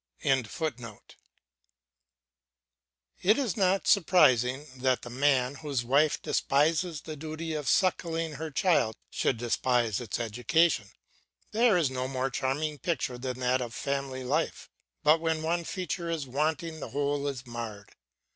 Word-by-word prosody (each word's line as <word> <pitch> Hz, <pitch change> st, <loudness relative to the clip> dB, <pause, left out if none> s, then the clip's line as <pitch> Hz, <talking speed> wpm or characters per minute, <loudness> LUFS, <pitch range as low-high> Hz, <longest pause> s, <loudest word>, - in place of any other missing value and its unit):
] -, -, -63 dB
It 130 Hz, -4 st, +2 dB, 2.9 s
is 255 Hz, -10 st, -1 dB
not 190 Hz, -1 st, +2 dB
surprising 135 Hz, -, +4 dB
that 130 Hz, 0 st, +1 dB
the 120 Hz, -, -8 dB
man 130 Hz, -1 st, +2 dB
whose 140 Hz, -5 st, -2 dB
wife 140 Hz, +5 st, +3 dB
despises 155 Hz, +3 st, +1 dB
the 155 Hz, -, -7 dB
duty 155 Hz, +2 st, -5 dB
of 150 Hz, -2 st, -2 dB
suckling 165 Hz, -3 st, +1 dB
her 160 Hz, +3 st, -5 dB
child 150 Hz, -, +2 dB, 0.2 s
should 125 Hz, -, 0 dB
despise 120 Hz, -1 st, +1 dB
its 115 Hz, -2 st, -4 dB
education. 120 Hz, +2 st, +1 dB, 0.6 s
There 225 Hz, -2 st, +4 dB
is 155 Hz, -7 st, +1 dB
no 130 Hz, 0 st, -2 dB
more 130 Hz, 0 st, -2 dB
charming 145 Hz, +4 st, -2 dB
picture 130 Hz, -5 st, -2 dB
than 125 Hz, 0 st, -4 dB
that 125 Hz, +1 st, +2 dB
of 120 Hz, -3 st, -5 dB
family 135 Hz, -2 st, -3 dB
life; 150 Hz, +6 st, -2 dB, 0.3 s
but 155 Hz, +2 st, +5 dB
when 160 Hz, -1 st, 0 dB
one 170 Hz, +2 st, 0 dB
feature 175 Hz, -2 st, -3 dB
is 160 Hz, -4 st, -2 dB
wanting 155 Hz, +4 st, -2 dB
the -, -, -6 dB
whole 145 Hz, 0 st, -1 dB
is 135 Hz, -2 st, -4 dB
marred. 115 Hz, -4 st, -7 dB
140 Hz, 135 wpm, -29 LUFS, 125-160 Hz, 2.9 s, but